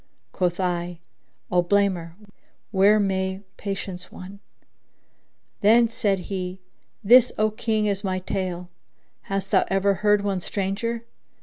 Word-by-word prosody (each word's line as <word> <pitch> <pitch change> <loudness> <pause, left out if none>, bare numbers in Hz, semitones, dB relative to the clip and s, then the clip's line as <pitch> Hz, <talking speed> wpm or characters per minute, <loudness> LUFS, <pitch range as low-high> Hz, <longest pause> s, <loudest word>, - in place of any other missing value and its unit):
* - - -48
Quoth 180 0 0
I, 175 -1 -1 0.5
'O 180 0 +4
blamer 180 -3 +1 0.6
where 205 +2 +5
may 190 -1 -1 0.2
patience 195 -2 -5
wone?'" 190 +2 -10 1.2
Then 225 +2 +5
said 200 -4 0
he, 185 -1 -4 0.4
"This, 245 +4 +7
O 215 0 +2
King! 215 0 -1
is 200 0 -1
my 185 -1 -1
tale: 180 -1 -4 0.6
hast 195 0 -2
thou 190 - +5
ever 195 +1 +2
heard 210 -1 +3
one 195 -2 -1
stranger?" 215 +5 -3
195 Hz, 125 wpm, -24 LUFS, 185-210 Hz, 1.2 s, This